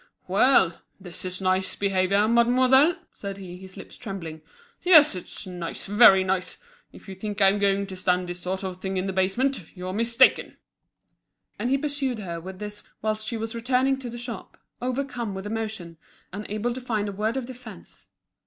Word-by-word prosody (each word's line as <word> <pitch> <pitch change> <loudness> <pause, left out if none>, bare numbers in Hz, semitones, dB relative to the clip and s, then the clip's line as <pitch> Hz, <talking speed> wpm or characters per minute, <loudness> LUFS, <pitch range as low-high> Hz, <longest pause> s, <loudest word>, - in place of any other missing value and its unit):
"Well! 190 -3 +4 0.2
this 180 -3 -9
is 185 +1 -4
nice 185 0 +1
behaviour, 195 +1 +2
mademoiselle!" 255 +7 +5 0.2
said 200 -1 -6
he, 180 -2 -9
his 190 0 -11
lips - - -10
trembling. 175 -8 -7 0.4
"Yes, 315 -5 +7
it's 185 +3 -6
nice, 175 -2 -6
very 200 -2 +7
nice! 185 -1 -1 0.3
If - - -15
you 195 - -6
think 205 +2 -5
I'm 195 +1 +4
going 200 0 +2
to 190 -1 -8
stand 180 0 0
this 175 0 -6
sort 190 +2 -3
of 185 -1 -5
thing 190 0 -3
in 185 - -1
the 190 - -2
basement, 195 - 0
you're 185 +1 -5
mistaken." 230 +4 +3 1.0
And 240 - -1
he 275 - +3
pursued 280 -4 -2
her 170 -5 -5
with 185 +2 -8
this 210 +1 -7 0.2
whilst 215 0 -1
she 230 - -2
was 225 +1 -4
returning 255 +3 +1
to 250 -2 -6
the 240 - -7
shop, 240 - -7 0.2
overcome 250 -4 -3
with 190 +1 -6
emotion, 215 -6 -4 0.4
unable 210 +4 -3
to 255 - -6
find 220 -4 -1
a - - -3
word 215 +5 -1
of 260 - -3
defence. 225 - -12
205 Hz, 180 wpm, -25 LUFS, 185-240 Hz, 1.0 s, Yes